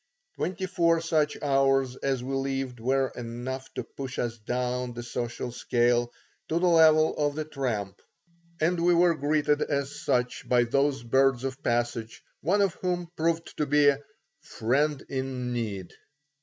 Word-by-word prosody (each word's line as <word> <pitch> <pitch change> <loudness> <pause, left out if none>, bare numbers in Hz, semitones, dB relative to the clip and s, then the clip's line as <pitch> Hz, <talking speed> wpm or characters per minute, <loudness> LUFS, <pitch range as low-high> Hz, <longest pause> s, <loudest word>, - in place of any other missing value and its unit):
Twenty 185 - -3
four 170 -2 +2
such 160 -2 +1
hours 135 -2 +2
as 135 -3 -1
we 135 +2 -4
lived 135 -2 -2
were 130 +3 +1
enough 120 +3 -6
to - - -3
push 135 -1 -7
us 120 -1 -2
down 125 +2 -2
the 120 0 -6
social 120 +1 -4
scale 120 0 +1 0.4
to 160 - +1
the 180 - +2
level 160 -2 +5
of 145 -1 0
the 155 0 -3
tramp, 120 -10 -3 0.6
and 170 +2 +1
we 175 0 +5
were 170 0 +5
greeted 150 0 +1
as 140 -1 -2
such 125 0 -1
by 125 -1 +5
those 135 +2 +1
birds 130 +1 +3
of 135 0 -4
passage, 120 -1 -2 0.2
one 195 +7 +2
of 195 -4 +1
whom 175 -2 -1
proved 165 +1 -1
to 150 - 0
be 145 0 +5
a 140 -1 +1 0.4
"friend 140 +5 0
in 130 -2 -3
need." 105 -6 -4
135 Hz, 155 wpm, -27 LUFS, 120-155 Hz, 0.6 s, level